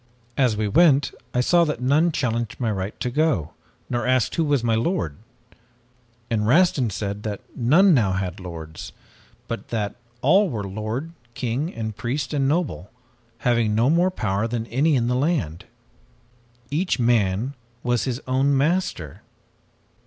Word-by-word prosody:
As 125 Hz, -6 st, +2 dB
we 105 Hz, 0 st, 0 dB
went 145 Hz, -, +4 dB, 0.2 s
I 125 Hz, -, +1 dB
saw 170 Hz, +6 st, +4 dB
that 150 Hz, -6 st, -2 dB
none 145 Hz, +7 st, +3 dB
challenged 120 Hz, -5 st, -2 dB
my 115 Hz, -3 st, 0 dB
right 95 Hz, 0 st, -4 dB
to 125 Hz, +1 st, -2 dB
go, 140 Hz, -, +1 dB, 0.4 s
nor 120 Hz, 0 st, -2 dB
asked 130 Hz, -3 st, +2 dB
who 165 Hz, -, +1 dB
was 145 Hz, -5 st, +1 dB
my 115 Hz, -1 st, +2 dB
lord. 110 Hz, -, 0 dB, 1.1 s
And 110 Hz, -2 st, 0 dB
Rastin 145 Hz, -3 st, +4 dB
said 100 Hz, 0 st, -4 dB
that 105 Hz, -2 st, -4 dB
none 165 Hz, +11 st, +5 dB
now 105 Hz, -9 st, +3 dB
had 95 Hz, 0 st, -3 dB
lords, 80 Hz, -4 st, -8 dB, 0.5 s
but 115 Hz, -, -5 dB
that 105 Hz, -3 st, -2 dB, 0.3 s
all 190 Hz, +8 st, +5 dB
were 110 Hz, -7 st, -3 dB
lord, 110 Hz, +10 st, -4 dB, 0.2 s
king 130 Hz, +7 st, -2 dB
and 110 Hz, -2 st, -4 dB
priest 130 Hz, +5 st, -3 dB
and 140 Hz, -2 st, +1 dB
noble, 145 Hz, -, -1 dB, 0.6 s
having 115 Hz, -3 st, +2 dB
no 120 Hz, +6 st, +3 dB
more 175 Hz, +3 st, +3 dB
power 105 Hz, -, -1 dB
than 115 Hz, -1 st, -3 dB
any 140 Hz, +6 st, +2 dB
in 120 Hz, -3 st, +1 dB
the 125 Hz, -, +1 dB
land. 125 Hz, -, -1 dB, 1.1 s
Each 175 Hz, +6 st, 0 dB
man 115 Hz, 0 st, +1 dB, 0.3 s
was 120 Hz, -1 st, +1 dB
his 125 Hz, -2 st, -2 dB
own 135 Hz, +2 st, +2 dB
master! 140 Hz, -, -1 dB
120 Hz, 155 wpm, -23 LUFS, 105-145 Hz, 1.1 s, none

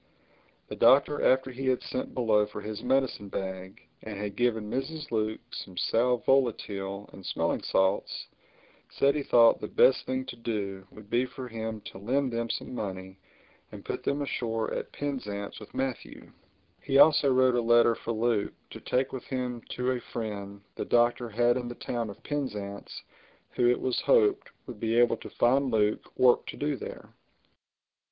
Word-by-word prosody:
The -, -, -6 dB
Doctor, 145 Hz, +2 st, +5 dB
after 130 Hz, 0 st, +3 dB
he 130 Hz, +1 st, -5 dB
had 130 Hz, -1 st, +1 dB
sent 130 Hz, -, -4 dB
below 110 Hz, -4 st, +3 dB
for 105 Hz, -, -7 dB
his 105 Hz, -1 st, -6 dB
medicine 130 Hz, -6 st, 0 dB
bag 95 Hz, -1 st, -5 dB, 0.2 s
and 110 Hz, -2 st, -7 dB
had 100 Hz, 0 st, -4 dB
given 110 Hz, -3 st, 0 dB
Mrs. 150 Hz, +7 st, -4 dB
Luke 110 Hz, -1 st, -1 dB
some 95 Hz, -2 st, -7 dB
sal 125 Hz, +5 st, +2 dB
volatile 105 Hz, -7 st, 0 dB
and 95 Hz, -, -11 dB
smelling -, -, -1 dB
salts, 95 Hz, +1 st, 0 dB, 0.6 s
said 140 Hz, 0 st, +2 dB
he 150 Hz, -, -1 dB
thought 115 Hz, -4 st, +5 dB
the 105 Hz, -, -3 dB
best 130 Hz, -, +4 dB
thing 130 Hz, 0 st, -2 dB
to 120 Hz, -, -7 dB
do 100 Hz, -5 st, -4 dB
would 105 Hz, -1 st, -15 dB
be 125 Hz, +2 st, +2 dB
for 130 Hz, 0 st, -8 dB
him 110 Hz, -2 st, -5 dB
to 95 Hz, -, -10 dB
lend 130 Hz, +5 st, 0 dB
them 115 Hz, 0 st, -2 dB
some -, -, -4 dB
money 95 Hz, -4 st, -6 dB, 0.5 s
and -, -, -10 dB
put -, -, -3 dB
them 145 Hz, +1 st, 0 dB
ashore 115 Hz, -5 st, -2 dB
at -, -, -4 dB
Penzance 105 Hz, -8 st, -4 dB
with 105 Hz, -, -12 dB
Matthew. 130 Hz, -2 st, -4 dB, 0.5 s
He 135 Hz, -1 st, +1 dB
also 145 Hz, -1 st, +6 dB
wrote 130 Hz, 0 st, +4 dB
a 120 Hz, -, +2 dB
letter 120 Hz, 0 st, +5 dB
for 115 Hz, -, -5 dB
Luke 115 Hz, -2 st, 0 dB, 0.2 s
to -, -, -8 dB
take 130 Hz, +1 st, -1 dB
with 130 Hz, -, -6 dB
him 125 Hz, -2 st, -3 dB
to 125 Hz, +1 st, -1 dB
a 125 Hz, -, -1 dB
friend 100 Hz, -4 st, -6 dB
the -, -, -4 dB
Doctor 120 Hz, 0 st, +2 dB
had 120 Hz, +3 st, +2 dB
in 125 Hz, -1 st, -4 dB
the 120 Hz, -, -6 dB
town 120 Hz, -2 st, -3 dB
of 100 Hz, -, -11 dB
Penzance 105 Hz, -9 st, -5 dB, 0.5 s
who, 120 Hz, -1 st, +2 dB
it 125 Hz, -, +2 dB
was 130 Hz, -1 st, -1 dB
hoped, 415 Hz, -5 st, +3 dB, 0.2 s
would 120 Hz, -5 st, -9 dB
be 115 Hz, +1 st, 0 dB
able 120 Hz, 0 st, +4 dB
to -, -, -10 dB
find 135 Hz, +3 st, +2 dB
Luke 105 Hz, -2 st, 0 dB
work 125 Hz, -1 st, +4 dB
to -, -, -7 dB
do 145 Hz, 0 st, -1 dB
there. -, -, -9 dB
120 Hz, 175 wpm, -28 LUFS, 105-130 Hz, 0.6 s, also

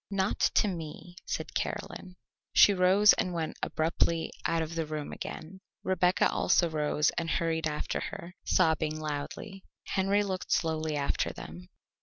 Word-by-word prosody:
"Not 195 Hz, 0 st, 0 dB, 0.2 s
to -, -, +4 dB
me," 175 Hz, -1 st, -6 dB
said -, -, -4 dB
Caroline. 180 Hz, -1 st, -4 dB, 0.4 s
She 205 Hz, -, +7 dB
rose, 190 Hz, +3 st, +6 dB
and 180 Hz, -, -1 dB
went 160 Hz, -2 st, -3 dB
abruptly 165 Hz, +1 st, 0 dB, 0.2 s
out 165 Hz, -1 st, +1 dB
of 160 Hz, +1 st, -6 dB
the 165 Hz, -2 st, -2 dB
room 150 Hz, -1 st, -4 dB
again. 190 Hz, +4 st, -8 dB, 0.2 s
Rebecca 185 Hz, -1 st, +3 dB
also 175 Hz, -, +3 dB
rose 150 Hz, 0 st, +1 dB
and 165 Hz, -1 st, -3 dB
hurried 160 Hz, -1 st, 0 dB
after 150 Hz, -1 st, -2 dB
her, 175 Hz, +1 st, -7 dB
sobbing 155 Hz, -1 st, +2 dB
loudly. 155 Hz, +6 st, -5 dB, 0.2 s
Henry 195 Hz, +1 st, +1 dB
looked 190 Hz, -2 st, -4 dB
slowly 160 Hz, -2 st, 0 dB
after 140 Hz, -1 st, 0 dB
them. 85 Hz, +3 st, -10 dB
165 Hz, 145 wpm, -29 LUFS, 155-185 Hz, 0.4 s, She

